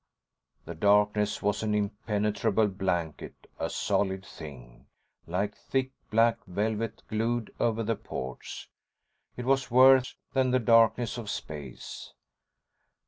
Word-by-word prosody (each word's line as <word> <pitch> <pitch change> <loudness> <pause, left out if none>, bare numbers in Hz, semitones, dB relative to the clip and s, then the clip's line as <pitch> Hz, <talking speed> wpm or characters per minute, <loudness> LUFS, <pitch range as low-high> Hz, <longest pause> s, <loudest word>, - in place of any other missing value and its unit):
The 85 - -6
darkness 105 +3 +2
was 105 -1 +1
an 105 -1 0
impenetrable 105 +1 0
blanket, 90 -5 -3
a - - -1
solid 95 -1 0
thing, 65 -7 -11 0.4
like 100 +5 -1
thick 130 -1 -2 0.2
black 115 0 +3
velvet 110 +4 -2
glued 115 +1 -1
over 115 -1 +1
the 115 +1 0
ports. 65 -9 -7 0.7
It 125 - -4
was 135 0 +2
worse 130 +1 +6 0.2
than 130 -1 +2
the 130 - +3
darkness 115 0 +3
of 110 -3 -6
space. 75 -9 -7
105 Hz, 115 wpm, -28 LUFS, 95-115 Hz, 0.7 s, worse